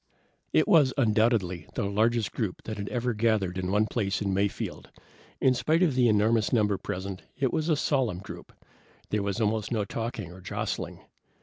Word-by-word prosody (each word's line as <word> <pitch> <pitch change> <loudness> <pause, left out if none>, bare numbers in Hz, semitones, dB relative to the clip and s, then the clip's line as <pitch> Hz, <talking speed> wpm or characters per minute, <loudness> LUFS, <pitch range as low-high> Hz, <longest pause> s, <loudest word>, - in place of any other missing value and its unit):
It - - +3
was 155 -10 +5
undoubtedly 110 - +2
the - - -1
largest 110 +3 +1
group 105 -7 -3
that 110 -2 -5
had 100 - -4
ever 125 0 -1
gathered 105 -5 +1
in 90 0 -2
one 105 +2 +3
place 100 -3 -1
in 100 -2 -1
Mayfield. 100 +1 -2 0.5
In 130 - +4
spite 160 +7 +2
of 160 -6 +3
the 125 -2 +4
enormous 110 +1 +3
number 105 -5 +2
present 95 0 -5 0.2
it 135 -3 0
was 160 0 0
a 160 - +4
solemn 130 - 0
group. 100 +2 -10 0.6
There 105 - +1
was 100 +2 -2
almost 110 0 0
no 110 -4 0
talking 115 -4 -4
or 90 +2 -12
jostling. - - -4
110 Hz, 180 wpm, -28 LUFS, 100-120 Hz, 0.6 s, was